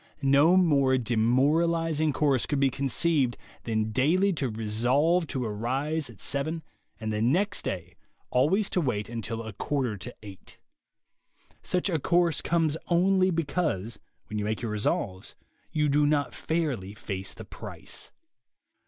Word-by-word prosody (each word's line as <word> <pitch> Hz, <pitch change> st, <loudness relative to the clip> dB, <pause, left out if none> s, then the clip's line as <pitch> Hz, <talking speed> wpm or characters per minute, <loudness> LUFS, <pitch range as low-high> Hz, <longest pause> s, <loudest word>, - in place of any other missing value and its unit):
No 140 Hz, +6 st, +5 dB
more 140 Hz, -7 st, +4 dB
demoralizing 150 Hz, +7 st, +2 dB
course 140 Hz, -3 st, +1 dB
could 145 Hz, -, 0 dB
be 135 Hz, -1 st, +3 dB
conceived 140 Hz, -1 st, +1 dB, 0.3 s
than 110 Hz, -1 st, 0 dB
daily 175 Hz, -, +3 dB
to 140 Hz, -6 st, -2 dB
resolve 125 Hz, +11 st, +1 dB
to 130 Hz, -3 st, -3 dB
arise 130 Hz, +7 st, -2 dB
at 110 Hz, -7 st, -14 dB
seven 155 Hz, +4 st, -2 dB, 0.4 s
and 110 Hz, -1 st, -3 dB
the 105 Hz, -, -1 dB
next 185 Hz, -, +2 dB
day 90 Hz, -1 st, -5 dB, 0.4 s
always 180 Hz, +11 st, +3 dB
to 180 Hz, -, +1 dB
wait 105 Hz, -8 st, -1 dB
until 115 Hz, 0 st, -4 dB
a 110 Hz, -1 st, -7 dB
quarter 125 Hz, 0 st, -2 dB
to 125 Hz, +6 st, -8 dB
eight. 100 Hz, -3 st, -12 dB, 1.0 s
Such 180 Hz, +1 st, -1 dB
a 165 Hz, -5 st, 0 dB
course 170 Hz, +1 st, +2 dB
comes 160 Hz, -2 st, +1 dB
only 185 Hz, +2 st, +3 dB
be 165 Hz, -2 st, 0 dB
cause, 120 Hz, -, -2 dB, 0.3 s
when 105 Hz, 0 st, -4 dB
you 105 Hz, -, -2 dB
make 110 Hz, +2 st, -2 dB
your 115 Hz, -, -2 dB
resolves, 100 Hz, -3 st, -2 dB, 0.4 s
you 150 Hz, -1 st, +1 dB
do 145 Hz, +1 st, +3 dB
not 145 Hz, -1 st, +1 dB
fairly 135 Hz, -, -2 dB
face 95 Hz, -2 st, -5 dB
the -, -, -9 dB
price. -, -, -8 dB
140 Hz, 145 wpm, -27 LUFS, 110-165 Hz, 1.0 s, No